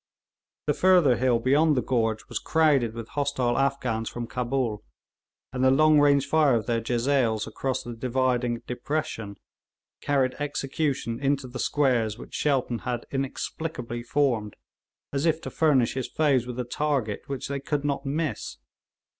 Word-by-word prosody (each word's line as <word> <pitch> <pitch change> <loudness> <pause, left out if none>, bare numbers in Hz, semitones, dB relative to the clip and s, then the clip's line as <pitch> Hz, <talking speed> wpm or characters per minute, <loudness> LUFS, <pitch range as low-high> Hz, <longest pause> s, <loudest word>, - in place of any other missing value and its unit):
The 150 - +2
further 180 -7 +4
hill 125 -1 +3
beyond 145 +5 +3
the 125 - +1
gorge 115 -3 0
was - - -3
crowded 140 -8 +2
with 115 -1 -7
hostile 140 -4 0
Afghans 130 -5 0
from 120 0 -5
Cabul, 120 -2 -2 0.7
and 130 0 -1
the 130 - +6
long 155 +3 +5
range 140 -1 +4
fire 145 -3 +3
of 110 - -1
their 115 -1 0
jezails 120 -2 +1
across 135 -1 -3
the 120 - -6
dividing 125 0 0
depression, 125 -6 -4 0.6
carried 135 -3 +1
execution 140 -4 -2
into 140 -1 0
the 125 +1 -7
squares 120 -7 +1
which - - -11
Shelton 130 -5 0
had 120 -2 -4
inexplicably 135 -2 -4
formed 120 -4 0 0.6
as 140 +4 +1
if 160 0 +2
to - - -6
furnish 140 -7 +3
his 130 -1 -3
foes 140 -6 +1
with 125 0 -5
a - - 0
target 125 -5 -1
which 135 -2 -4
they 140 0 -3
could 145 +1 -2
not 140 -1 -1
miss. 155 +2 -3
130 Hz, 155 wpm, -26 LUFS, 120-145 Hz, 0.7 s, the